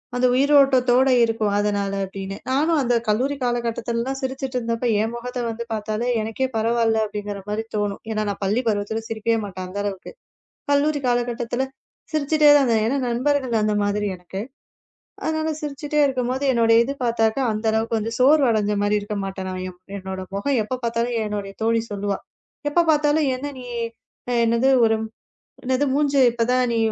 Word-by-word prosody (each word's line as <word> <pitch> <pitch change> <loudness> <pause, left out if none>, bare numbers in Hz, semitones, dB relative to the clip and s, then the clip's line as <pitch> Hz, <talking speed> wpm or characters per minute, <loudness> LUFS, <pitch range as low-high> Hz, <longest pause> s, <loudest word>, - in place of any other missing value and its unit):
அந்த 245 +1 +2
உயிரோட்டத்தோட 265 -2 +4
இருக்கும் 225 -2 0
அதனால 205 -1 0
அப்படின்னு. 195 0 -6
நானும் 305 +4 +2
அந்தக் 240 -2 +1
கல்லூரி 255 +7 +1
காலகட்டத்துல 235 -1 -1
தான் 270 0 -2
சிரிச்சிட்டு 265 -1 -3
இருந்தப்ப 230 +1 -2
என் 225 +2 -2
முகத்தை 245 +1 -5
வந்து 230 +1 -4
பார்த்தாலே 215 +2 -2
எனக்கே 225 +4 -2
பரவால்ல 225 0 +2
அப்படிங்கிற 205 -1 -5
மாதிரி 215 +2 -1
தோணும். 205 -1 -2
ஏன்னா 215 -1 -1
நான் 200 - -5
பள்ளி 205 +5 +1
பருவத்துல 215 +1 -1
சிரிக்கவே 225 +1 0
மாட்டேன். 185 -2 -6
அந்த 190 +2 -5
அளவுக்கு 195 -2 -5 0.6
கல்லூரி 290 +1 +2
காலகட்டத்துல 240 +1 -1 0.5
சிரிச்சுட்டே 305 0 +4
தான். 265 -4 +2
ஏன்னா 260 +5 +1
நண்பர்கள் 255 -1 +1
அந்த 210 0 +1
மாதிரி 205 +1 0
எனக்கு. 180 +2 -7 0.8
அதனால 315 0 0
சிரிச்சுட்டே 295 +1 -3
இருக்கும்போது 260 0 -1
என்னோட 230 -2 +3
இது 275 - -3
பாத்தாக்க 225 0 +1
அந்த 215 +1 -4
அளவுக்கு 225 +1 0
வந்து 225 +2 -3
சோர்வடைஞ்ச 250 -7 +4
மாரி 210 0 +2
இருக்கவே 205 0 -4
மாட்டேன். 190 -1 -5 0.5
என்னோட 190 0 -6 0.2
முகம் 250 +5 +1
எப்ப 255 +4 -4
பாத்தாலும் 235 +1 -1
என்னுடைய 205 -1 -4
தோழி 230 0 +2
சொல்லுவா, 200 0 -2 0.5
எப்ப 345 +4 +4
பாத்தாலும் 295 0 +2
என்ன 285 +3 -5
நீ, 250 - -9 0.8
என்னது 230 -2 +2 0.7
மூஞ்சு 285 -1 +2
இப்ப 235 0 0
தான் 255 -1 +2
நீ - - +1
230 Hz, 150 wpm, -22 LUFS, 210-265 Hz, 0.8 s, உயிரோட்டத்தோட